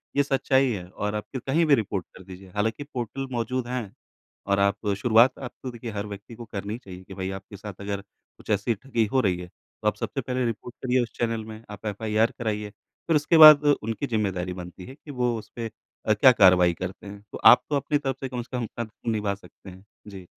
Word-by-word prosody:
ये 140 Hz, -, +4 dB
सच्चाई 135 Hz, -1 st, +2 dB
है 95 Hz, -5 st, -4 dB
और 105 Hz, +2 st, -3 dB
आप 105 Hz, -, -2 dB
फिर 130 Hz, -3 st, -4 dB
कहीं 160 Hz, +5 st, +3 dB
भी 150 Hz, -3 st, +6 dB
रिपोर्ट 100 Hz, -6 st, -2 dB
कर 95 Hz, -, -12 dB
दीजिए, 95 Hz, +1 st, -12 dB
हालाँकि 110 Hz, +6 st, -1 dB
पोर्टल 135 Hz, -1 st, -5 dB
मौजूद 125 Hz, +1 st, -2 dB
हैं 125 Hz, -5 st, -4 dB, 0.5 s
और 100 Hz, 0 st, +2 dB
आप 100 Hz, +2 st, +1 dB
शुरुआत 115 Hz, +4 st, +4 dB
अब 130 Hz, -2 st, -6 dB
तो 130 Hz, -, -4 dB
देखिए 120 Hz, -1 st, -7 dB
हर 100 Hz, 0 st, -4 dB
व्यक्ति 100 Hz, +3 st, -9 dB
को 120 Hz, -, -9 dB
करनी 105 Hz, +2 st, -4 dB
चाहिए 95 Hz, -6 st, -11 dB
कि 95 Hz, -, -11 dB
भई 95 Hz, 0 st, -4 dB
आपके 95 Hz, +1 st, -12 dB
साथ 100 Hz, +1 st, -8 dB
अगर 100 Hz, 0 st, -3 dB
कुछ 100 Hz, -, -22 dB
ऐसी 105 Hz, +3 st, +1 dB
ठगी 115 Hz, 0 st, -1 dB
हो 130 Hz, -, +4 dB
रही 95 Hz, -6 st, +1 dB
है, 90 Hz, -, -7 dB
तो -, -, -9 dB
आप -, -, +2 dB
सबसे -, -, -3 dB
पहले 125 Hz, -1 st, -1 dB
रिपोर्ट 120 Hz, +1 st, -4 dB
करिए 125 Hz, 0 st, +3 dB
उस 115 Hz, -, -7 dB
चैनल 115 Hz, -2 st, -1 dB
में, 110 Hz, 0 st, -10 dB
आप 105 Hz, +1 st, -10 dB
एफआईआर 110 Hz, +2 st, +1 dB
कराइए, 105 Hz, -2 st, -2 dB, 0.4 s
फिर 165 Hz, -, +3 dB
उसके 150 Hz, +3 st, +3 dB
बाद 155 Hz, -2 st, +10 dB
उनकी 140 Hz, -2 st, +1 dB
जिम्मेदारी 95 Hz, -6 st, -1 dB
बनती 90 Hz, 0 st, -9 dB
है 130 Hz, -, -10 dB
कि 145 Hz, -, -11 dB
वो 125 Hz, -3 st, 0 dB
उसपे 115 Hz, +2 st, -7 dB, 0.4 s
अ, -, -, +5 dB
क्या -, -, +7 dB
कार्रवाई 90 Hz, -1 st, +6 dB
करते 95 Hz, +4 st, -7 dB
हैं। 100 Hz, 0 st, -9 dB
तो -, -, -6 dB
आप -, -, +9 dB
तो 150 Hz, -, +1 dB
अपनी 145 Hz, +1 st, +1 dB
तरफ़ 135 Hz, -2 st, -3 dB
से 135 Hz, -, -3 dB
कम 125 Hz, -1 st, -3 dB
से 125 Hz, +1 st, -6 dB
कम 120 Hz, -, -2 dB
सब 120 Hz, -, -7 dB
अपना 115 Hz, +1 st, -5 dB
निभा 105 Hz, -2 st, -1 dB
सकते 100 Hz, 0 st, -15 dB
हैं। 95 Hz, +2 st, -14 dB, 0.2 s
जी। 95 Hz, -3 st, -10 dB
110 Hz, 230 wpm, -26 LUFS, 100-125 Hz, 0.5 s, बाद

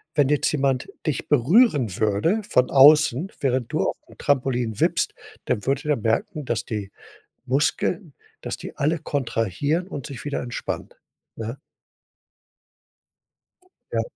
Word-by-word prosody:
wenn 145 Hz, -3 st, +3 dB
jetzt 150 Hz, -1 st, +2 dB
jemand 135 Hz, -3 st, 0 dB, 0.2 s
dich 155 Hz, -, -2 dB
berühren 145 Hz, -, +4 dB
würde 110 Hz, -, +1 dB
von 125 Hz, 0 st, +3 dB
außen, 150 Hz, +3 st, +6 dB
während 130 Hz, -4 st, 0 dB
du -, -, 0 dB
aufm -, -, -7 dB
Trampolin 125 Hz, -5 st, 0 dB
wippst, -, -, +1 dB, 0.3 s
dann 105 Hz, -, -1 dB
würde 135 Hz, +2 st, 0 dB
der 150 Hz, -1 st, +1 dB
merken, 115 Hz, -, -1 dB
dass 120 Hz, -3 st, -2 dB
die 105 Hz, -3 st, -5 dB, 0.5 s
Muskeln 150 Hz, +5 st, 0 dB, 0.3 s
dass -, -, -4 dB
die -, -, -9 dB
alle 155 Hz, +3 st, +1 dB
kontrahieren 140 Hz, -, -1 dB
und 145 Hz, -9 st, -6 dB
sich 135 Hz, -5 st, -8 dB
wieder 145 Hz, -, -2 dB
entspannen, 120 Hz, -1 st, -5 dB, 0.5 s
ne? 115 Hz, +4 st, -6 dB, 2.3 s
Ja. -, -, +1 dB
135 Hz, 125 wpm, -23 LUFS, 120-150 Hz, 2.3 s, außen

